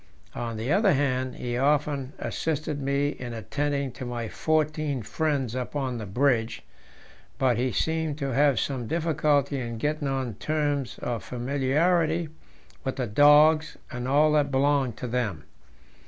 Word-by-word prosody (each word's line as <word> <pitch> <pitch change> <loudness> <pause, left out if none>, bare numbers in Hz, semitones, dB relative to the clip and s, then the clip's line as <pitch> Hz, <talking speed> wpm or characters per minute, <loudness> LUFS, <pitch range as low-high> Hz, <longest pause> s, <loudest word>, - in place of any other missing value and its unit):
On 115 -2 -4
the 115 +6 -2
other 195 +1 +4
hand, 130 -2 0
he 120 -1 -3
often 145 -1 +1
assisted 155 -2 -3
me 140 +1 +1
in 125 -4 -6
attending 140 +4 -2
to 125 - -8
my 120 -2 -4
fourteen 155 -4 0
friends 140 -3 -1
up 130 +2 -4
on 130 -4 -2
the 105 - -6
bridge; 115 +1 +1 0.7
but 130 -4 +2
he 125 +1 0
seemed 160 -2 -1
to 140 -4 -2
have 140 -2 +3
some 130 -5 -2
difficulty 150 -3 +1
in 120 -2 -4
getting 150 +4 -1
on 135 -3 -2
terms 145 +1 -1
of 120 -2 -2
familiarity 155 +6 +1 0.5
with 130 - -2
the 130 - -1
dogs 150 +7 +5
and 125 0 -4
all 150 +3 +4
that 150 -2 +2
belonged 135 -3 +1
to 125 - -5
them. 115 -9 -2
140 Hz, 150 wpm, -26 LUFS, 125-150 Hz, 0.7 s, dogs